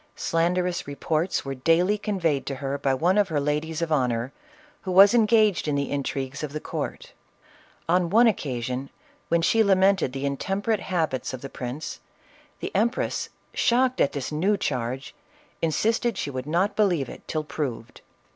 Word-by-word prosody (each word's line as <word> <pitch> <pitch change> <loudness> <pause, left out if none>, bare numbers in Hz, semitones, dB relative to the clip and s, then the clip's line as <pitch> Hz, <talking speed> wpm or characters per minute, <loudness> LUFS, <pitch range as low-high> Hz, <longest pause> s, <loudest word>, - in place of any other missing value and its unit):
Slanderous 175 +1 0
reports 155 +5 -1
were 135 - -3
daily 165 +9 +2
conveyed 185 -9 -1
to 135 - -2
her 140 +1 -3
by 135 - +1
one 180 +8 +2
of 205 - +3
her 155 -4 0
ladies 150 +3 -1
of 165 - -3
honor, 125 -3 0 0.5
who 185 - -4
was 195 +3 +8
engaged 215 -6 +3
in 150 - +1
the 140 0 -1
intrigues 140 -1 -3
of 150 -2 -5
the 155 - -3
court. - - -5 0.7
On 175 0 +2
one 230 +6 +5
occasion 130 - -1 0.4
when 170 0 +2
she 225 +6 +4
lamented 190 -6 +3
the 135 +1 -5
intem 190 +9 -2
perate 220 -1 +1
habits 160 -10 -2
of 125 - -11
the 135 - -7
prince, 130 +5 -6 0.6
the - - -4
empress 230 +6 0 0.2
shocked 255 +2 +2
at - - +2
this 140 -1 -4
new 190 +7 +1
charge, 130 -2 -3 0.5
insisted 225 +7 +1
she 140 - -3
would 130 +1 -5
not 185 +6 +1
believe 180 - +2
it, - - -10
till 155 -1 -2
proved. 140 -6 -5
160 Hz, 165 wpm, -25 LUFS, 140-195 Hz, 0.7 s, was